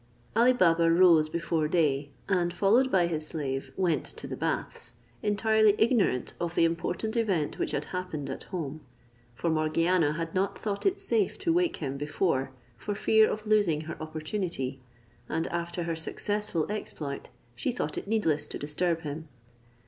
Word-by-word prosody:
Ali 235 +3 +6
Baba 170 -7 +4
rose 165 -3 +6
before 165 -1 0
day, 150 -4 +1 0.2
and, 180 -3 +1
followed 220 +9 +3
by 180 -2 +4
his 155 -2 -2
slave, 135 -4 -3
went 175 -6 +1
to - - -7
the - - -5
baths, - - -3 0.3
entirely 215 0 +3
ignorant 220 - +2
of 170 0 -3
the 165 - +5
important 170 +6 -1
event 195 -10 0
which - - 0
had 145 - -2
happened 180 -6 -3
at - - -6
home; 155 -5 -5 0.5
for 165 +7 -1
Morgiana 160 +1 +2
had 165 +1 -4
not 190 +1 0
thought 205 - -2
it 390 +1 +1
safe 230 - 0
to 335 - +1
wake 350 -1 +2
him 140 -3 -4
before, 145 -2 0 0.3
for 200 - -4
fear 220 +1 +4
of 215 0 -4
losing 205 -8 +3
her 160 +1 -7
opportunity; 155 -4 -3 0.5
and 165 +1 -1
after 170 0 -3
her 165 -1 -2
successful 205 +1 0
exploit 150 -9 -5 0.2
she 120 - -2
thought 155 -10 -3
it - - -5
needless 160 -9 +1
to - - -5
disturb 165 +3 -1
him. 155 +1 -6
170 Hz, 165 wpm, -28 LUFS, 155-205 Hz, 0.5 s, Ali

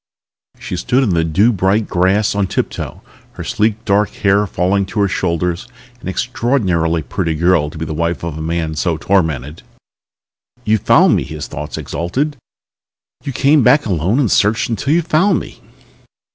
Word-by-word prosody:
She 90 - -5
stood 125 +9 +1
in 110 - +1
the 85 -2 +2
dew 95 +9 +2
bright 100 +3 +1
grass 95 +4 +1
on 100 -1 0
tiptoe, - - -4 0.3
her - - -7
sleek 110 +2 -1
dark 105 0 +2
hair 100 +1 +1
falling 95 +3 0
to 105 - -4
her 100 - +3
shoulders, 90 +2 -2 0.3
an - - -9
extraordinarily 95 - 0
pretty 85 -2 -2
girl 85 -2 +2
to 75 - -11
be 80 - -4
the 80 - -4
wife 85 +2 -2
of 85 -3 -4
a 80 - -6
man 80 0 -2
so 80 +1 -1
tormented. 80 -4 -1 1.0
"You 110 +1 +2
found - - +4
me!" - - +1
his 75 -1 -7
thoughts 75 +1 -6
exulted. 135 - -2 0.9
"You 140 - -4
came 140 +3 +3
back 145 +4 +4
alone 95 - 0
and 125 -8 +1
searched 105 +3 +2
until 115 +5 -1
you 170 +2 +3
found 170 +4 +2
me!" - - -11
95 Hz, 170 wpm, -17 LUFS, 85-110 Hz, 1.0 s, found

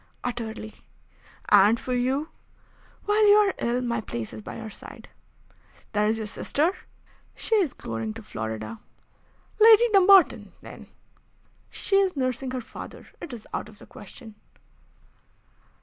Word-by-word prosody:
"Utterly." 225 -3 -5 0.8
"And 205 +3 +6
for 255 - -4
you? 265 +5 -1 0.8
"While 420 +1 +3
you 410 - +7
are 415 -2 +4
ill 240 +1 0
my 235 -2 -1
place 115 - -6
is 110 - -8
by - - -8
your 220 -1 -8
side." - - -12 0.8
"There 210 0 +2
is 220 +1 +1
your 220 - -4
sister?" 300 - -1 0.6
"She - - -3
is 350 -10 0
going 115 -1 -5
to - - -9
Florida." 110 0 -6 0.8
"Lady 450 +2 +7
Dumbarton, 365 - +5
then?" - - -11 0.8
"She 390 - 0
is 385 -3 +2
nursing 255 0 -2
her 255 0 -4
father. 240 - -11
It 340 - -7
is 235 -3 -9
out - - -4
of 215 - -16
the - - -14
question." 220 +2 -12
240 Hz, 140 wpm, -25 LUFS, 210-335 Hz, 0.8 s, you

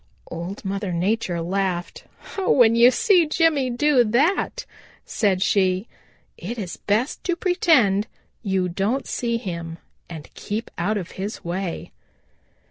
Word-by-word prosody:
Old 175 +5 -6
Mother 195 0 -3
Nature 180 0 -1
laughed. 180 0 -2 0.3
"When 250 - +4
you 235 +1 +7
see 345 - +3
Jimmy 305 -4 +2
do 255 +1 +3
that," 295 - +1 0.4
said 195 -3 +1
she, 190 0 +1 0.5
"it 230 +8 -5
is 190 -6 -5
best 220 +7 -1
to 350 - +1
pretend 265 - +2 0.3
you 190 -4 0
don't 200 +9 -1
see 235 -1 -2
him 170 -7 -6 0.3
and 160 -3 -10
keep 215 +3 -5
out 205 +5 -1
of 185 -3 -6
his 205 +3 -5
way." 175 0 -4
205 Hz, 130 wpm, -23 LUFS, 185-250 Hz, 0.5 s, you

